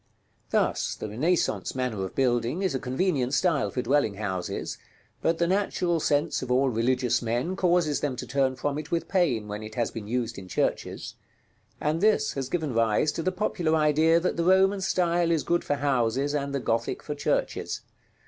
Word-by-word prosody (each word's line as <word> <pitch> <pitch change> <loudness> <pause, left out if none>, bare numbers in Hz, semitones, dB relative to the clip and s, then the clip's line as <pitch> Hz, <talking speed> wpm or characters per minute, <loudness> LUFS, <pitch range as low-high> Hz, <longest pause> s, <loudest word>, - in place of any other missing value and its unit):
Thus - - 0
the - - -6
Renaissance 155 - 0
manner 125 -6 -2
of 95 - -6
building 125 +6 +1
is 190 - +1
a 130 - -1
convenient 135 -1 0
style 160 -1 +2
for 125 - -3
dwelling 135 -7 +2
houses, 95 -4 -4 0.4
but 165 0 +1
the 170 - +2
natural 180 -2 +1
sense 145 -1 +1
of 130 - -5
all 130 +2 +3
religious 125 +1 +1
men 120 +10 -1
causes 175 -5 +2
them 140 -3 -2
to - - -6
turn 135 -1 +1
from 145 +2 -2
it 155 - -8
with 170 -1 -1
pain 140 - +1
when 105 +1 -5
it 110 0 -8
has 120 -2 0
been 110 -3 -7
used 120 -1 -2
in 95 - -10
churches; - - -2 0.7
and 155 +3 0
this 210 -8 +3
has 135 -2 -4
given 155 -5 -1
rise 115 +5 +2
to 165 - -4
the 185 - 0
popular 175 -4 0
idea 155 +2 +4
that 180 +1 -1
the 170 - +1
Roman 190 +2 +4
style 175 -2 +1
is 165 -3 +1
good 175 0 +1
for 145 - 0
houses 135 0 0
and 140 -1 -1
the - - 0
Gothic 115 -2 -1
for 150 - -4
churches. 145 - -1
145 Hz, 190 wpm, -27 LUFS, 120-170 Hz, 0.7 s, idea